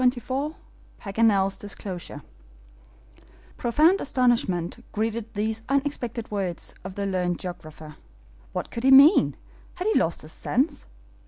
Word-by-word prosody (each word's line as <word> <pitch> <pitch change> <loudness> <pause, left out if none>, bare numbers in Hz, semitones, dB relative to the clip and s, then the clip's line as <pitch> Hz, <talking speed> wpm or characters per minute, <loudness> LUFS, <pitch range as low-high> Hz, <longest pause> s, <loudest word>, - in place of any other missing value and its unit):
CHAPTER 250 0 +3
XXIV 275 +6 -3 0.4
PAGANEL'S 195 -2 +2
DISCLOSURE 185 -7 -6 1.3
PROFOUND 310 - +3
astonishment 230 -10 +1
greeted 225 +1 -2
these 220 +2 -1
unexpected 270 -5 -1
words 190 -4 -3
of 190 0 -7
the 200 - -2
learned 180 -2 0
geographer. 155 -4 -8 0.5
What - - -4
could 230 - -5
he 265 - +4
mean? 275 +7 +7 0.4
Had 360 - -4
he 435 - +3
lost 165 - -1
his 155 - -7
sense? 280 - -1
220 Hz, 120 wpm, -25 LUFS, 185-265 Hz, 1.3 s, mean